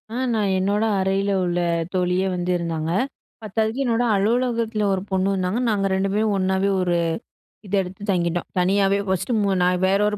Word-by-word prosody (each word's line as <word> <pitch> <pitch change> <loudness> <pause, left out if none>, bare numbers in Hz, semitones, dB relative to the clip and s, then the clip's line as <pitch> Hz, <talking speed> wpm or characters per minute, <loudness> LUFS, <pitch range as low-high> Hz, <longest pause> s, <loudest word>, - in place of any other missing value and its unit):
ஆ - - -2 0.2
நான் 210 -3 +1
என்னோட 200 +3 +1
அறைல 195 +1 0
உள்ள 175 0 0 0.3
தோழியே 180 +1 +1
வந்து 180 0 -2
இருந்தாங்க. 165 -2 -3 0.5
பத்தாததுக்கு 220 +4 -1
என்னோட 235 0 +1
அலுவலகத்துல 230 +1 0
ஒரு 190 - -1
பொண்ணு 190 0 +1
வந்தாங்க. 185 +3 -1
நாங்க 205 -2 +1
ரெண்டு 190 +1 0
பேரும் 210 0 +1
ஒண்ணாவே 190 +1 +1
ஒரு 175 -1 +1 0.7
இத 190 - -10
எடுத்து 190 +2 -8
தங்கிட்டோம். 175 -1 -1
தனியாவே 195 +2 +2
ஃபர்ஸ்ட்டு 190 +5 -1
மு 200 - +1
நான் 180 0 +2
வேற 195 +1 +2
ஒரு 210 0 -1
195 Hz, 165 wpm, -22 LUFS, 180-210 Hz, 0.7 s, தனியாவே